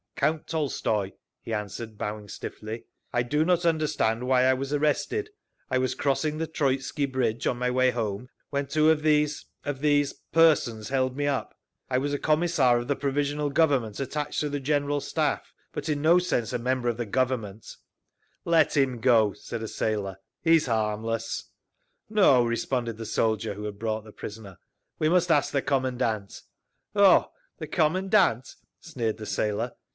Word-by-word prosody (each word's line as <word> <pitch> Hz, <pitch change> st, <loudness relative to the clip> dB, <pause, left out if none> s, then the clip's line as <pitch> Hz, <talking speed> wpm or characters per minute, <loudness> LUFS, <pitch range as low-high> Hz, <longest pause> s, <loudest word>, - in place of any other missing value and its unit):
"Count 155 Hz, 0 st, 0 dB
Tolstoy," 115 Hz, -10 st, -1 dB, 0.3 s
he -, -, -8 dB
answered, 105 Hz, +1 st, -5 dB
bowing 105 Hz, 0 st, -5 dB
stiffly. 110 Hz, +3 st, -7 dB, 0.3 s
"I 120 Hz, -, +1 dB
do 150 Hz, +6 st, +1 dB
not 175 Hz, +1 st, +2 dB
understand 150 Hz, -8 st, +1 dB
why 130 Hz, -1 st, +4 dB
I 130 Hz, -, +5 dB
was 135 Hz, +1 st, -4 dB
arrested. 150 Hz, -, 0 dB, 0.4 s
I 130 Hz, -, +1 dB
was 130 Hz, 0 st, 0 dB
crossing 150 Hz, +2 st, 0 dB
the 160 Hz, -, -1 dB
Troitsky 140 Hz, -2 st, -1 dB
Bridge 125 Hz, -4 st, -1 dB
on 125 Hz, -, 0 dB
my 125 Hz, 0 st, 0 dB
way 130 Hz, 0 st, +3 dB
home 115 Hz, 0 st, -3 dB, 0.2 s
when 140 Hz, -1 st, -1 dB
two 155 Hz, +2 st, +4 dB
of 155 Hz, -1 st, +1 dB
these—of 150 Hz, -2 st, 0 dB
these—persons 145 Hz, -4 st, +2 dB
held 130 Hz, -1 st, 0 dB
me 145 Hz, -, 0 dB
up. 135 Hz, -6 st, -2 dB, 0.3 s
I 130 Hz, -, +1 dB
was 145 Hz, +2 st, -1 dB
a 145 Hz, -, -1 dB
Commissar 155 Hz, -6 st, +3 dB
of 120 Hz, 0 st, -3 dB
the 140 Hz, -, +1 dB
Provisional 145 Hz, +1 st, -1 dB
Government 140 Hz, -8 st, +1 dB
attached 145 Hz, +2 st, -2 dB
to 150 Hz, -, -1 dB
the 145 Hz, 0 st, -2 dB
General 145 Hz, +1 st, 0 dB
Staff, 150 Hz, +2 st, -2 dB, 0.2 s
but 150 Hz, +2 st, -5 dB
in 145 Hz, -1 st, -1 dB
no 170 Hz, +3 st, +6 dB
sense 125 Hz, -, -1 dB
a -, -, 0 dB
member 125 Hz, 0 st, 0 dB
of 115 Hz, -, -2 dB
the 120 Hz, -, -2 dB
Government…" 115 Hz, -4 st, -2 dB, 0.7 s
"Let 160 Hz, -3 st, +3 dB
him 130 Hz, -3 st, +2 dB
go," 110 Hz, -5 st, +4 dB
said 115 Hz, +3 st, -7 dB
a -, -, -3 dB
sailor. 105 Hz, -3 st, -2 dB, 0.3 s
"He's 165 Hz, -3 st, +4 dB
harmless…." 115 Hz, 0 st, -1 dB, 0.6 s
"No," 190 Hz, -, +5 dB
responded 115 Hz, 0 st, -1 dB
the 115 Hz, -1 st, -6 dB
soldier 110 Hz, -1 st, 0 dB
who 105 Hz, -, -7 dB
had 100 Hz, -1 st, -6 dB
brought 110 Hz, -1 st, -2 dB
the 110 Hz, -, -13 dB
prisoner. 105 Hz, -4 st, -9 dB, 0.4 s
"We 155 Hz, -, +2 dB
must 175 Hz, 0 st, +3 dB
ask 145 Hz, -3 st, +3 dB
the 140 Hz, -, 0 dB
commandant." 125 Hz, -6 st, -1 dB, 0.5 s
"Oh, 200 Hz, -2 st, +5 dB, 0.3 s
the -, -, -6 dB
commandant!" 180 Hz, -, +2 dB, 0.2 s
sneered 120 Hz, -10 st, -3 dB
the 110 Hz, -1 st, -7 dB
sailor. 105 Hz, -1 st, -1 dB
130 Hz, 165 wpm, -27 LUFS, 115-150 Hz, 0.7 s, no